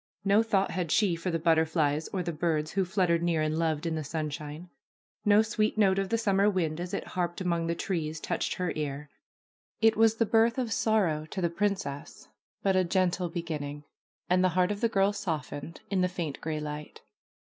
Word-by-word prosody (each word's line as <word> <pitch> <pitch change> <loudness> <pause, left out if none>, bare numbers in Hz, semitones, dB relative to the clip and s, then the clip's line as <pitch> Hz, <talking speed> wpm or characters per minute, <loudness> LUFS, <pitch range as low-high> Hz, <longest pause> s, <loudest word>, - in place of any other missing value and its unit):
No 200 +2 +5
thought 200 -4 +1
had 175 -4 -2
she 200 -6 +3
for 165 +2 -3
the 165 - 0
butterflies 160 -2 +2
or 185 -2 -3
the 170 - -2
birds 155 -1 -1
who 195 -1 +1
fluttered 180 -3 +1
near 170 -2 +1
and 155 0 0
loved 160 -1 0
in 165 - -1
the 155 -1 -2
sunshine. 155 +2 -5 0.5
No 205 +1 +6
sweet 215 0 0
note 195 -2 +4
of 195 -1 -2
the 230 - +2
summer 200 -2 +3
wind 170 -5 -1
as 175 0 -4
it - - -4
harped 175 -1 -2
among 170 -3 0
the 170 - 0
trees 160 -4 -3
touched - - -2
her 180 -2 -2
ear. 145 -1 -4 0.7
It 225 -1 +4
was 225 0 +4
the 230 - +2
birth 225 +2 +3
of 240 -4 -1
sorrow 175 -9 +1
to 190 - -5
the 170 -2 0
princess, 190 -7 -3 0.4
but 195 -1 +2
a 185 - +4
gentle 180 0 +1
beginning, 150 -4 -5 0.4
and 180 +1 +3
the 185 - +4
heart 180 +2 +3
of 205 - -4
the 230 - +3
girl 200 -1 +2
softened 160 -4 -5
in 190 -2 +2
the 180 - +2
faint 170 -6 -4
gray 155 -1 -2
light. 150 0 -7
175 Hz, 200 wpm, -29 LUFS, 155-195 Hz, 0.7 s, No